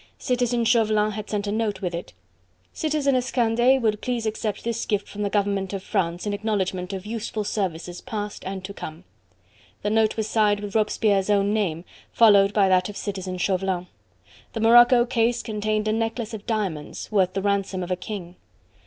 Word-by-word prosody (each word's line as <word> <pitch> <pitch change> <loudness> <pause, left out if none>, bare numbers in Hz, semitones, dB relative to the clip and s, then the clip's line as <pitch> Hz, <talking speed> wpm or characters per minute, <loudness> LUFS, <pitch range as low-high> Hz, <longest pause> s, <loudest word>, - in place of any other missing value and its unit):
Citizen 245 -1 0
Chauvelin 215 -2 +3
had 215 0 -6
sent 205 -1 -2
a 205 - -2
note 215 -2 -1
with 180 -1 -2
it. 170 +1 -5 0.6
"Citizeness 280 -5 0
Candeille 240 +2 +3
will 220 -3 +1
please 235 +1 -3
accept 215 -1 -3
this 230 0 -2
gift 205 -2 -1
from 210 - -7
the 205 - 0
government 200 -1 0
of 195 -1 -4
France 175 0 -1
in 205 - -1
acknowledgment 195 -3 -2
of 190 0 -5
useful 220 -1 -3
services 180 -4 -3
past 210 -1 -5
and 190 0 -5
to 200 - -7
come." 160 -2 -8 0.8
The 210 - 0
note 220 0 +2
was 220 -1 -1
signed 210 -2 +2
with 205 -1 -6
Robespierre's 210 -2 +2
own 200 0 +3
name, 180 -6 -1 0.3
followed 200 -3 +6
by 205 -2 +3
that 185 0 +3
of 205 - -7
Citizen 190 -3 -4
Chauvelin. 185 -1 0 0.7
The - - -3
morocco 240 +2 +7
case 240 -1 +1
contained 215 -1 -1
a 215 - +2
necklace 225 0 -2
of 215 0 -8
diamonds 195 -11 -3
worth 190 -3 +2
the 195 - -1
ransom 195 -2 0
of 180 - -6
a - - +2
king. 180 -2 -7
210 Hz, 180 wpm, -24 LUFS, 195-225 Hz, 0.8 s, morocco